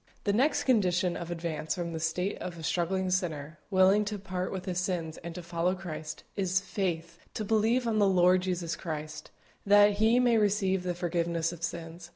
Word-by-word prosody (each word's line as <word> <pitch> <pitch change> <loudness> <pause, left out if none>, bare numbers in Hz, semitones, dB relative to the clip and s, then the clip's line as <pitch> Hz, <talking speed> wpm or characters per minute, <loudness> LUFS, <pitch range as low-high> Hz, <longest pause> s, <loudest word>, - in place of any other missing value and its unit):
The 200 - +1
next 270 +7 +2
condition 185 -7 +2
of 170 - -6
advance 165 -2 -3
from 170 -2 -4
the 160 - -3
state 175 +4 -1
of 175 -2 -6
a 165 - -9
struggling 185 +3 0
sinner, 160 -4 -2
willing 190 +1 +5
to 210 0 -3
part 185 -1 -4
with 190 -1 -5
his 180 -2 -1
sins 175 -4 -2
and 170 0 -8
to 180 - -6
follow 170 +2 0
Christ, 160 -4 -7
is 190 -2 +1
faith, 170 -4 -3 0.2
to 215 - -3
believe 225 +4 +2
on 220 -2 +1
the 200 -1 +4
Lord 180 0 +4
Jesus 175 -2 -2
Christ, 155 -2 -6 0.3
that 205 0 +5
he 225 +3 +4
may 240 -2 +4
receive 195 -2 +1
the 180 -1 -3
forgiveness 170 -1 -1
of 170 -2 -10
sins. 170 0 -6
180 Hz, 195 wpm, -29 LUFS, 170-200 Hz, 0.3 s, willing